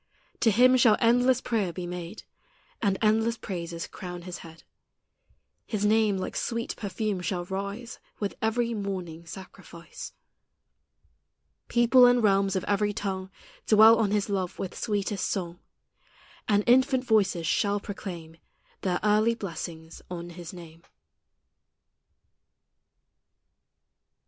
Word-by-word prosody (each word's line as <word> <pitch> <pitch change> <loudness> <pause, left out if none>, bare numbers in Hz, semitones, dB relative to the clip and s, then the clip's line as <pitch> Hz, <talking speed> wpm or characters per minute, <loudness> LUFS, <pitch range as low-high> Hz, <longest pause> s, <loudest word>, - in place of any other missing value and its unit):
To 230 - +4
Him 250 +4 +5
shall 230 -4 +5
endless 245 +2 +3
prayer 210 -7 -1
be 180 +1 -6
made, 175 +3 -7 0.6
And 200 -4 +1
endless 225 +2 +2
praises 170 -4 -5
crown 180 -2 -8
His 180 0 -7
head; 165 0 -13 1.0
His 210 -2 -1
name 215 -1 +3
like 185 - -4
sweet 230 0 -2
perfume 205 -1 -3
shall 180 -1 -2
rise 200 +5 -5 0.2
With 205 -2 -2
every 230 +1 0
morning 185 -6 -5
sacrifice. 180 -2 -10 1.5
People 245 +1 +6
and 245 -1 +3
realms 195 -1 +3
of 185 - -1
every 205 0 0
tongue 190 -2 -4 0.4
Dwell 220 +1 +7
on 215 -3 +2
His 205 0 0
love 190 -3 -2
with 185 - -5
sweetest 205 -2 -2
song, 175 -3 -3 0.9
And 205 0 +3
infant 260 +1 +4
voices 195 -7 +2
shall 205 +4 +1
proclaim 175 -5 -8 0.4
Their 180 -2 0
early 215 +2 +3
blessings 165 -5 -7
on 175 -1 -6
His 170 -1 -9
name. 170 -2 -12
200 Hz, 120 wpm, -27 LUFS, 180-220 Hz, 1.5 s, Dwell